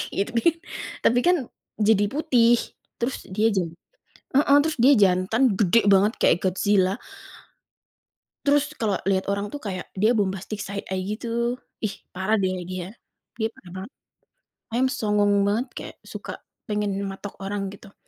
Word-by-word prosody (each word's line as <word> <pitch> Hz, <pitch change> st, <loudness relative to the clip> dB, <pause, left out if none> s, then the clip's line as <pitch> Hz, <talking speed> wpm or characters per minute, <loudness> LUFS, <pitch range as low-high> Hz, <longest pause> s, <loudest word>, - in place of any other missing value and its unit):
itu 200 Hz, -, -1 dB
kan, 300 Hz, +8 st, +3 dB, 0.5 s
tapi, 245 Hz, +1 st, +4 dB
kan, 355 Hz, 0 st, +5 dB, 0.4 s
jadi 210 Hz, -1 st, +4 dB
putih. 250 Hz, -5 st, +4 dB, 0.4 s
Terus, 240 Hz, +3 st, -3 dB
dia 215 Hz, +4 st, +2 dB
jan 175 Hz, -4 st, 0 dB, 0.6 s
heeh, 280 Hz, 0 st, +5 dB
terus 310 Hz, -1 st, -2 dB
dia 265 Hz, +5 st, +6 dB
jantan, 200 Hz, +4 st, +3 dB
gede 210 Hz, +2 st, +4 dB
banget, 200 Hz, +3 st, +5 dB
kayak -, -, +5 dB
Godzilla. 190 Hz, +1 st, +2 dB, 1.5 s
Terus, 290 Hz, +1 st, +2 dB
kalau 210 Hz, -4 st, +1 dB
liat 190 Hz, 0 st, +1 dB
orang, 200 Hz, +1 st, -1 dB
tuh, 290 Hz, -, -5 dB
kayak, 185 Hz, -3 st, -4 dB
dia 215 Hz, +4 st, +4 dB
bombastic 195 Hz, +1 st, -2 dB
side 200 Hz, +1 st, -5 dB
eye 190 Hz, 0 st, -1 dB
gitu. 235 Hz, +3 st, -2 dB, 0.3 s
Ih, 205 Hz, -, -1 dB, 0.2 s
parah, 190 Hz, +4 st, +1 dB
deh, 185 Hz, -2 st, -1 dB
dia. 185 Hz, +2 st, -6 dB, 0.5 s
Dia 220 Hz, -, +2 dB
parah 175 Hz, -, -15 dB
banget. 235 Hz, -, -11 dB, 0.8 s
Ayam 255 Hz, +2 st, +3 dB
songong 210 Hz, -5 st, +2 dB
banget, 225 Hz, +6 st, +1 dB
kek -, -, -7 dB
suka -, -, -8 dB, 0.3 s
pengen 210 Hz, -2 st, -1 dB
matok 195 Hz, +1 st, -7 dB
orang, 195 Hz, 0 st, -3 dB
gitu. 200 Hz, 0 st, -14 dB
210 Hz, 145 wpm, -24 LUFS, 195-235 Hz, 1.5 s, dia